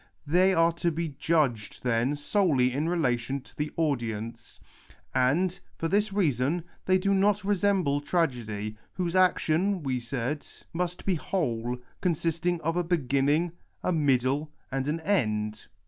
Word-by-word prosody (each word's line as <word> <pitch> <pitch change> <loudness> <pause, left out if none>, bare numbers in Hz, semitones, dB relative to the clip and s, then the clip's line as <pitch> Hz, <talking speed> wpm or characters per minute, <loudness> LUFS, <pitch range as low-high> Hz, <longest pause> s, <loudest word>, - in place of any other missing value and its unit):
They 180 +6 +4
are 165 0 +4
to 170 +1 0
be 165 0 -2
judged, 140 -7 0
then, 125 +3 +1
solely 145 -5 +2
in 150 +5 0
relation 135 -6 0
to - - -18
the 150 0 -2
audience. 115 -7 -2 0.5
And, 165 +9 +2 0.2
for 165 - -1
this 205 +4 +1
reason, 160 - +1 0.2
they 185 0 +5
do 200 +1 +1
not 200 +1 +3
resemble 195 -7 +2
tragedy, 115 - -1 0.2
whose 180 -1 -2
action, 185 0 +2
we 130 -2 -1
said, 125 +4 -3 0.3
must 180 +1 -3
be 195 - +2
whole, 125 -9 -1 0.2
consisting 170 0 0
of 165 +3 -1
a 175 - +2
beginning, 150 0 +1 0.3
a - - +1
middle, 140 0 +1 0.2
and 135 0 -1
an 160 +2 -1
end. 110 - 0
155 Hz, 140 wpm, -28 LUFS, 125-175 Hz, 0.5 s, they